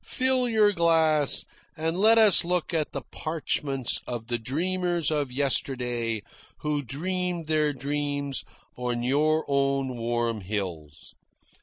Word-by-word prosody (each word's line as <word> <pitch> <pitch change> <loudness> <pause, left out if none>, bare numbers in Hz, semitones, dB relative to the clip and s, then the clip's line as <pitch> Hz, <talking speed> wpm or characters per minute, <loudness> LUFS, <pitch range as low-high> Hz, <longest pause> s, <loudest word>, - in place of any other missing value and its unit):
Fill 255 -1 +3
your 215 -2 +4
glass 160 -4 +4 0.3
and 160 +1 -1
let 220 +4 +5
us 215 -4 +6
look 180 0 -1
at 155 -2 0
the - - -5
parchments 145 -5 -2
of 120 -1 -6
the 120 -1 -1
dreamers 175 +5 -1
of 145 -4 -1
yesterday 125 -4 -1 0.4
who 150 -1 -1
dreamed 175 +6 -3
their 155 -1 +1
dreams 145 0 -3 0.3
on 120 -1 -3
your 155 +5 +2
own 135 -2 0
warm 115 -1 -2
hills." 90 -7 -6
145 Hz, 125 wpm, -26 LUFS, 125-170 Hz, 0.4 s, us